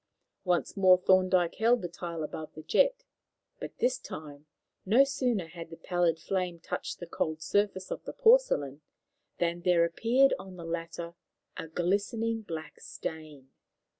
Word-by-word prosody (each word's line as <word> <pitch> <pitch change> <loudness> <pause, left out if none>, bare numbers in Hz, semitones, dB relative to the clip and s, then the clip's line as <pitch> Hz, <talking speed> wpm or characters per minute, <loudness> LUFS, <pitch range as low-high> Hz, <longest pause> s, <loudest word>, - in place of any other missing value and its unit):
Once 180 -1 0
more 185 -2 +6
Thorndyke 185 -1 +3
held 230 0 +3
the - - -1
tile 170 -1 -6
above 155 0 -7
the 155 - -9
jet, - - +2 0.6
but - - -8
this 255 0 +1
time, 150 - -9 0.4
no 230 +8 +5
sooner 250 -8 -1
had 165 -1 -9
the 165 - -10
pallid 175 -2 +1
flame 180 0 -2
touched - - -5
the 175 - -7
cold 160 -1 -2
surface 190 +2 0
of - - -4
the - - -6
porcelain, 445 - +3 0.6
than 175 0 -1
there 175 -1 +4
appeared 240 +10 +3
on 190 -1 -10
the 170 -2 -9
latter 170 0 -5 0.4
a - - -6
glistening 205 +7 -1
black 160 -6 -7
stain. 150 -4 -8
175 Hz, 150 wpm, -29 LUFS, 165-205 Hz, 0.6 s, more